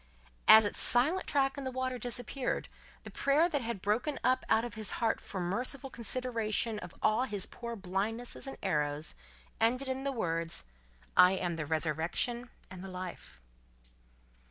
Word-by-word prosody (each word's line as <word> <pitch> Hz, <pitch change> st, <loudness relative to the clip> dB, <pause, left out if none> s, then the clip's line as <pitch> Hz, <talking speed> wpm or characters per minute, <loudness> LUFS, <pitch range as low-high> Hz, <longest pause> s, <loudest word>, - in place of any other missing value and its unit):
As 220 Hz, 0 st, +10 dB
its 205 Hz, -, +2 dB
silent 295 Hz, +10 st, +5 dB
track 275 Hz, 0 st, +1 dB
in -, -, -6 dB
the 260 Hz, -, -2 dB
water 255 Hz, -1 st, -3 dB
disappeared, 245 Hz, +2 st, -1 dB, 0.4 s
the -, -, -9 dB
prayer 290 Hz, +5 st, +3 dB
that 295 Hz, -5 st, -1 dB
had 230 Hz, -5 st, -5 dB
broken 240 Hz, +8 st, 0 dB
up 255 Hz, 0 st, +2 dB
out 225 Hz, +2 st, +3 dB
of 240 Hz, -, -7 dB
his 220 Hz, -2 st, -3 dB
heart 230 Hz, -1 st, 0 dB
for 195 Hz, -, -8 dB
a -, -, -1 dB
merciful 250 Hz, +8 st, -3 dB
consideration 230 Hz, -2 st, -1 dB
of 180 Hz, -4 st, -10 dB
all 220 Hz, +4 st, +3 dB
his 205 Hz, -6 st, -1 dB
poor 235 Hz, -1 st, -7 dB
blindnesses 210 Hz, +7 st, -2 dB
and 270 Hz, -, -7 dB
errors, 150 Hz, -4 st, 0 dB, 0.5 s
ended 250 Hz, +4 st, +2 dB
in 260 Hz, 0 st, -3 dB
the 275 Hz, -, -1 dB
words, 165 Hz, -, -2 dB, 0.5 s
"I 180 Hz, +1 st, +7 dB
am 180 Hz, -3 st, -2 dB
the 155 Hz, -2 st, -4 dB
resurrection 165 Hz, -, -1 dB, 0.2 s
and 185 Hz, 0 st, -9 dB
the -, -, -7 dB
life." 185 Hz, -, -8 dB
225 Hz, 165 wpm, -31 LUFS, 185-255 Hz, 0.5 s, As